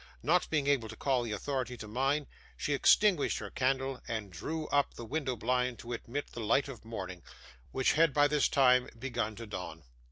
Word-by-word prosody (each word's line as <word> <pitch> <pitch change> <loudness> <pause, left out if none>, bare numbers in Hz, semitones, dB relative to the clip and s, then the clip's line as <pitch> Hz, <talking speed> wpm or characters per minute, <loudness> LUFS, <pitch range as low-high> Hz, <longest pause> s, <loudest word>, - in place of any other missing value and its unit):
Not 175 +4 +2
being 150 -3 +1
able 135 -6 +1
to 110 - -8
call 130 +1 +1
the 120 -2 -4
authority 125 +3 -3
to 110 - -8
mind, 135 +6 0 0.3
she 145 - -1
extinguished 180 +3 +4
her - - -6
candle, 135 0 0
and 110 -4 -4
drew 155 - -4
up 145 0 +1
the 120 - -7
window 135 +1 -2
blind 125 +1 0
to 120 +1 -6
admit 125 +4 -5
the - - -8
light 115 +6 +2
of 130 -6 -9
morning, 95 -6 -6 0.5
which 130 -1 +2
had, 165 0 +4
by 145 +1 +4
this 150 0 +2
time, 125 -2 +4
begun 120 -3 -2
to 115 +2 -7
dawn. 90 -6 -7
130 Hz, 195 wpm, -32 LUFS, 115-145 Hz, 0.5 s, extinguished